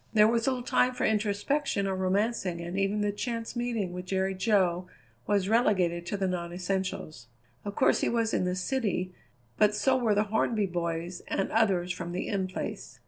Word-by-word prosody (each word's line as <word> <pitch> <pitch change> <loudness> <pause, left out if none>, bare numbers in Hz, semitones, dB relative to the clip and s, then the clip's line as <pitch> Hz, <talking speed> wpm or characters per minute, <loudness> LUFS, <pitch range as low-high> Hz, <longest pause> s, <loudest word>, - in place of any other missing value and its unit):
There 210 -1 +6
was 230 +1 +1
little 255 -2 0
time 250 +1 +2
for - - 0
introspection 210 +3 0
or 195 -1 -1
romancing 190 -1 0
and 170 +1 -5
even 195 +2 +1
the 205 0 +1
chance 230 +2 -4
meeting 230 -6 -2
with 180 0 -6
Jerry 190 0 0
Jo 185 -3 +1 0.4
was 200 -2 +2
relegated 185 -6 +2
to 205 - -2
the 195 -1 0
non 175 -2 -3
essentials. 180 - -3 0.4
Of 205 0 -5
course - - +3
he - - +2
was 230 -1 0
in - - +2
the 180 0 0
city, 185 -3 -1 0.4
but 210 0 +4
so 260 +5 +3
were 230 -5 +2
the 205 - +3
Hornby 220 -1 +2
boys 170 -1 -3
and 195 - -1
others 190 -5 +2
from 175 -1 -6
the 180 - -3
In 195 -2 -1
Place. 185 - -6
195 Hz, 190 wpm, -29 LUFS, 180-220 Hz, 0.4 s, There